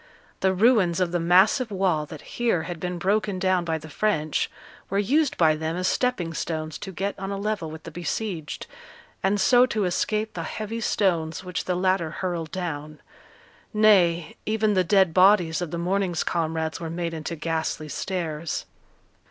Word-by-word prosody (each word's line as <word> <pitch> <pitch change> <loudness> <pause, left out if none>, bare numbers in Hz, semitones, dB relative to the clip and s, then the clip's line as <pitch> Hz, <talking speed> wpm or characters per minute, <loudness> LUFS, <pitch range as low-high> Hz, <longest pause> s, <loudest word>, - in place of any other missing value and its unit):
The 190 - +3
ruins 190 -4 +3
of 180 -2 +1
the 175 - 0
massive 190 +9 +4
wall 185 -6 0
that 155 -1 -9 0.2
here 225 -9 +2
had 175 -1 -6
been 180 +1 -3
broken 200 +2 0
down 185 -1 +2
by 165 -1 -1
the 155 0 -10
French, 155 -3 0 0.4
were 195 - -1
used 275 +9 +2
by 160 -2 +4
them 160 +1 -3
as 185 +1 0
stepping 220 -10 0
stones 155 -2 -4
to 195 - -6
get 195 +3 -2
on 195 0 -4
a 200 - -3
level 200 -5 -2
with 160 +1 -9
the - - -8
besieged, 175 -1 -4 0.6
and 200 +2 +1
so 245 +5 +5
to 215 -5 0
escape 215 +4 -1
the - - -4
heavy 220 +2 -4
stones 170 -6 0
which 180 0 -4
the 180 - 0
latter 185 -2 +1
hurled 170 -2 -3
down; 155 -5 -5 0.8
nay, 180 -6 +4
even 215 -1 +1
the 185 -2 +3
dead 190 -2 +3
bodies 180 -3 +5
of 175 - -3
the 170 - -4
morning's 180 0 0
comrades 160 -1 -1
were 165 -2 -5
made 170 0 -3
into 160 +1 -4
ghastly 160 -1 -2
stairs. 165 -2 -3
180 Hz, 175 wpm, -25 LUFS, 165-200 Hz, 0.8 s, so